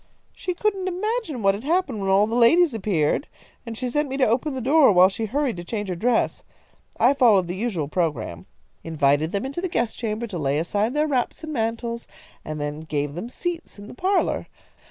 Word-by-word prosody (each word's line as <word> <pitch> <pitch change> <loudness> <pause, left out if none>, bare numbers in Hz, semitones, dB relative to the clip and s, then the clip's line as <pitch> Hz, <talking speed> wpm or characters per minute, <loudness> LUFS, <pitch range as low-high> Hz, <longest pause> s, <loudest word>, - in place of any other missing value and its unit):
"She 360 - -4
couldn't 390 -1 -1
imagine 370 - -2
what 195 0 +4
had 205 +4 -6
happened 295 - 0
when 195 - -1
all 195 +2 +5
the 220 - -5
ladies 285 +7 +5
appeared, 190 - 0 0.4
and 225 -1 -6
she 255 - -2
sent 295 +3 -1
me 270 - -3
to 265 - +4
open 265 +6 0
the - - -3
door 275 +1 +5
while 185 0 +6
she 220 +3 -4
hurried 260 0 -1
to 175 - -6
change 205 +1 -4
her 180 - -2
dress. 235 +6 0 0.6
I - - +5
followed 220 -10 +4
the 175 - -4
usual 190 -8 -2
programme; 140 - -2 0.4
invited 155 0 +1
them 200 +4 -2
into 280 +6 -4
the 370 - -2
guest 240 -9 -1
chamber 225 0 -2
to 195 -7 -5
lay 140 -1 0
aside 205 - 0
their 300 +1 +2
wraps 260 +1 -1
and 310 -1 -5
mantles, 230 0 -2 0.4
and 155 0 -5
then 145 +1 -3
gave 145 -2 -3
them 180 +9 -6
seats 345 +2 -5
in 205 0 -10
the - - -10
parlour. 375 +9 0
225 Hz, 210 wpm, -23 LUFS, 180-280 Hz, 0.6 s, while